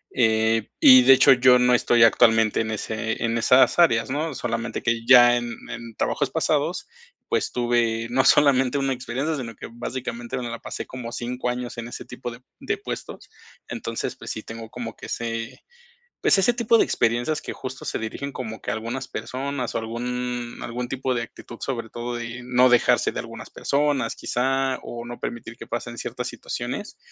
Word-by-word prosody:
Eh, 110 -2 +2
y 130 -1 +9
de 135 - +7
hecho, 135 +1 +8
yo 125 0 +5
no 125 0 +4
estoy 120 -1 +4
actualmente 115 -1 +4
en 110 0 -3
ese 110 +1 -3
en 115 0 0
esas 125 +6 +4
áreas, 120 -9 +4
¿no?, 150 +3 -2
solamente 115 -2 -3
que 115 -1 -1
ya 120 -1 +8
en 120 -1 -3
en 115 -1 -7
trabajos - - 0
pasados, - - 0 0.4
pues - - 0
tuve 120 -2 0
no 130 +2 +2
solamente 135 -1 +4
una 135 -1 0
experiencia, 130 +5 -3
sino 115 -5 -6
que - - -8
básicamente 120 0 -5
me 125 - -4
la 115 - -6
pasé - - -6
como 125 -2 -7
5 125 +1 -3
años 125 0 -4
en 115 0 -5
ese - - -8
tipo 120 0 -7
de 115 - -11 0.2
de - - -2
puestos. - - -7 0.4
Entonces, - - -4
pues - - -7
sí, 110 - -5
tengo 115 0 -9
como 120 -2 -7
que - - -10
ese 115 -1 -4 0.6
pues - - +4
ese 195 +5 +3
tipo 235 -1 +3
de - - +5
experiencias 120 +6 0
que - - -6
justo 130 0 -7
se - - -3
dirigen 135 +5 -5
como 110 -3 -6
que - - -3
a - - -1
algunas 120 +4 -4
personas 130 -1 -4
o - - +1
algún 120 +1 -4
algún 120 +1 -4
tipo 130 0 -2
de 120 - -1
actitud, 115 +1 -11
sobre 115 -4 -4
todo 120 +1 -5
de 120 +1 -6
no 125 +1 +4
dejarse 120 -1 +3
de - - -3
algunas - - -9
personas, 140 -4 0
quizá, 135 +1 0
o 120 0 -7
no 120 0 -8
permitir 120 -1 -6
que - - -11
pasen 120 0 -4
ciertas 125 +1 -5
situaciones. 125 - -5
120 Hz, 190 wpm, -24 LUFS, 115-130 Hz, 0.6 s, y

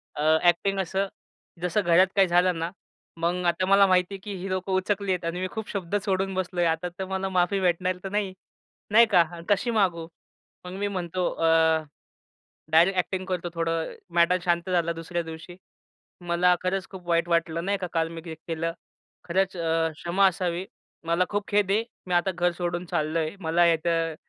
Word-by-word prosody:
अ, 150 - -4 0.2
acting 195 +3 +2
असं 190 +2 -1 0.5
जसं 180 +4 +1
घरात 175 +1 +5
काही 195 -2 +5
झालं 175 0 +3
ना, 165 +1 -2 0.5
मग 175 +2 -1
आता 175 +2 +1
मला 195 +1 +6
माहितीये 185 +1 +1
की 205 - -5
हि 190 +2 -5
लोकं 185 +1 -2
उचकलीयेत 190 -1 0
आणि 170 +2 -2
मी 185 - -1
खूप 220 -2 -6
शब्द 195 -1 -3
सोडून 195 0 0
बसलोय. 180 -2 -1
आता 165 +1 0
तर 190 - -2
मला 190 0 -2
माफी 185 +1 +1
भेटणार 185 0 +1
तर 195 - -4
नाही, 200 -1 -1 0.6
नाही 230 +3 +7
का. 180 - +7
हा 175 - -10
कशी 205 +4 +2
मागू? 180 -7 +1 0.6
मग 180 - -7
मी 205 - 0
म्हणतो 185 -2 -2
अ, 165 - -1 1.3
डायरेक्ट 175 +4 +5
अ‍ॅक्टिंग 185 +1 -1
करतो 180 -2 -2
थोडं, 165 -1 -1 0.2
मॅटर 175 +1 +4
शांत 175 0 0
झाला 170 -2 +1
दुसऱ्या 170 +1 -4
दिवशी. 160 +2 -9 0.6
"मला 175 +1 +3
खरंच 185 +1 -1
खूप 185 -2 -11
वाईट 170 0 +2
वाटलं." 170 0 0
नाही 200 +1 0
का. 185 - -3
"काल 165 -1 +1
मी 165 0 -8
ते 165 -2 -6
केलं, 165 +1 -4 0.5
खरंच 190 +2 0
अ, 165 -1 +1
क्षमा 175 +5 +2
असावी, 180 0 -2 0.4
मला 170 +2 +2
खूप 205 0 -2
खेद 205 -2 +2
आहे. 215 +3 +2 0.2
मी 180 - -2
आता 175 +2 +2
घर 175 0 +1
सोडून 175 0 -2
चाललोय, 160 -1 -1
मला 170 0 +2
इथं" 165 0 0
180 Hz, 180 wpm, -26 LUFS, 170-190 Hz, 1.3 s, नाही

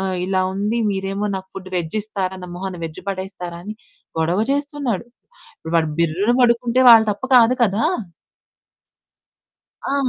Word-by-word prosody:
ఆహ్, 190 -1 -1
ఇలా 190 0 0
ఉంది 210 +4 -1
మీరేమో, 195 +1 -2
నాకు 190 0 -6
ఫుడ్డు 185 -1 -8
వెజ్జిస్తారా? 190 +2 -3
నా - - -6
మొహాన 190 0 -5
వెజ్ 160 -1 -7
పడేస్తారా?" 185 -3 -5
అని 215 +1 -6 0.4
గొడవ 170 +4 +1
చేస్తున్నాడు. 280 -6 -2 0.5
ఇప్పుడు 160 - -8
వాడు 160 -1 +2
బిర్రున 170 +6 +1
పడుకుంటే 240 0 +3
వాళ్ళ 225 -1 +9
తప్పు 205 +6 -4
కాదు 240 +1 +6
కదా! 215 +3 +2 2.0
ఆ! 275 - -1
195 Hz, 135 wpm, -20 LUFS, 185-230 Hz, 2.0 s, వాళ్ళ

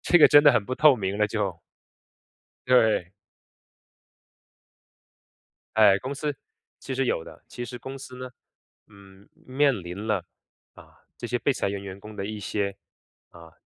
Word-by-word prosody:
这 - - +4
个 155 - +9
真 145 0 +7
的 145 - +8
很 120 -4 +1
不 130 - -3
透 150 -1 +5
明 100 -2 -3
了 105 - +3
就。 100 -5 -3 1.1
对。 110 -8 +3 2.7
哎， 105 -3 +6
公 130 +6 -5
司 150 +1 -3 0.4
其 135 - -6
实 135 +1 0
有 80 - 0
的 - - -14
其 120 - -6
实 120 +1 -8
公 135 +3 -8
司 130 -1 -10
呢， 130 0 -8 0.6
嗯， 100 -1 -18
面 140 +2 +1
临 90 +5 -7
了， 105 -5 0 0.5
啊， - - -18 0.2
这 120 - -6
些 120 +1 -1
被 140 - +1
裁 125 - -2
员 100 0 -4
员 100 -1 -8
工 105 +1 -11
的 100 - -4
一 110 0 -5
些， 100 0 -3 0.5
啊， 85 -1 -15
110 Hz, 170 characters per minute, -25 LUFS, 100-130 Hz, 2.7 s, 个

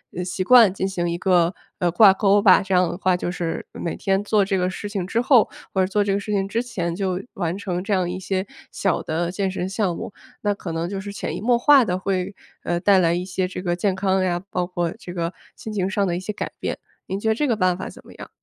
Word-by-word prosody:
呃， 180 - -2
习 185 +1 -2
惯 230 -3 +7
进 190 0 -2
行 175 -3 -2
一 170 - -1
个， 180 -2 +3 0.2
呃， 175 -1 +1
挂 195 +3 +7
钩 200 +1 +3
吧。 195 -1 +6
这 190 0 -3
样 180 -1 +3
的 - - -5
话， 185 -1 +2
就 180 - -3
是， 170 -2 -3
每 170 - -4
天 195 +1 0
做 210 -1 +2
这 195 0 0
个 180 0 +1
事 205 +2 -5
情 195 -4 -3
之 230 +4 0
后 245 -3 +5 0.3
或 190 - +2
者 - - +3
做 205 +1 +1
这 200 - -1
个 200 - +1
事 210 +1 -6
情 195 -1 0
之 230 +4 -1
前， 175 -9 -3
就 190 -1 -2
完 175 -1 -2
成 180 -3 -3
这 205 +1 -1
样 185 -2 +1
一 180 +1 -4
些 190 +1 -2 0.2
小 195 -3 0
的 170 +2 -2
健 195 0 -1
身 185 0 -3
项 195 -3 -1
目。 - - -6 0.3
那 205 -1 0
可 180 - -6
能 165 +1 -2
就 195 0 -4
是 200 +1 -7
潜 - - -4
移 - - -7
默 240 +2 +3
化 270 -1 +6
地 180 -1 -1
会， 190 0 -2 0.3
呃， 175 0 -1
带 200 +1 +4
来 170 -2 +3
一 175 +1 -1
些 185 0 -2
这 180 0 -6
个 175 -2 -1
健 190 +2 0
康 190 0 +1
呀， 175 -1 0
包 180 -1 -1
括 175 -2 -2
这 175 - -9
个 170 -1 -2 0.2
心 220 - -8
情 190 -3 -1
上 200 0 0
的 175 -1 -1
一 - - -3
些 200 +3 -5
改 - - -5
变。 - - -3 0.3
您 190 - -3
觉 220 +2 0
得 220 - +2
这 295 - 0
个 235 - +2
办 185 -3 +1
法 190 - -5
怎 - - -14
么 - - -14
样？ - - -10
190 Hz, 295 characters per minute, -22 LUFS, 180-200 Hz, 0.3 s, 惯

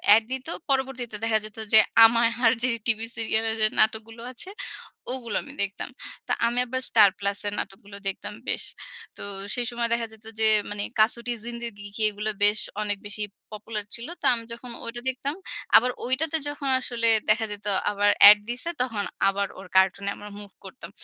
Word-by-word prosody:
Add 225 - +3
দিত, 265 +2 -4 0.2
পরবর্তীতে 265 -4 -1
দেখা 220 -1 +3
যেত 215 +1 -11 0.2
যে, 220 - +10 0.3
আমায় 230 0 +4
আর 225 - +7
যে 255 - +3 0.2
টিভি 225 0 +1
সিরিয়াল 225 0 0 0.2
যে 215 - +6
নাটকগুলো 220 +1 +1
আছে 360 +9 -7 0.6
ওগুলো 235 -5 -4
আমি 285 - -10
দেখতাম। 200 0 -5 0.4
তো - - -4 0.2
আমি 240 +1 0
আবার 260 +2 -3
স্টার 200 - +7
প্লাস 200 0 -1
এর 205 - -1
নাটকগুলো 200 +1 -7
দেখতাম 195 +2 -4
বেশ। - - -2 0.5
তো - - -8 0.3
সেই 245 -1 -1
সময় 235 -1 -1
দেখা 230 -1 0
যেত 220 0 -18
যে 220 - +4 0.2
মানি 205 0 -3 0.2
কাসুটির 235 +1 +1
জিন্দেগি 235 -4 -7
কি 220 - -4
এগুলো 210 +1 -4
বেশ 210 +1 +5 0.2
অনেক 205 -1 -2
বেশি 210 +1 -3 0.3
পপুলার 210 0 -5
ছিল। 235 +1 -6
তো - - -4
আমি 230 -1 -3
যখন 240 +1 -9
ওইটা 240 +1 -6
দেখতাম, 270 +3 -3 0.4
আবার 250 +2 +3
ওইটাতে 295 +5 0
যখন 285 -2 -4
আসলে 235 -2 -1 0.2
দেখা 220 +1 +3
যেত 205 0 -8 0.3
আবার 205 0 +2 0.2
এড 210 - +9
দিছে, 250 +8 -4
তখন 225 -5 -1 0.2
আবার 200 0 +1
ওর 190 - -10
কার্টুনে 190 +1 +3
আমরা 210 0 -8
মুভ 200 -1 -9
করতাম। 195 - -9
225 Hz, 180 wpm, -25 LUFS, 205-240 Hz, 0.6 s, যে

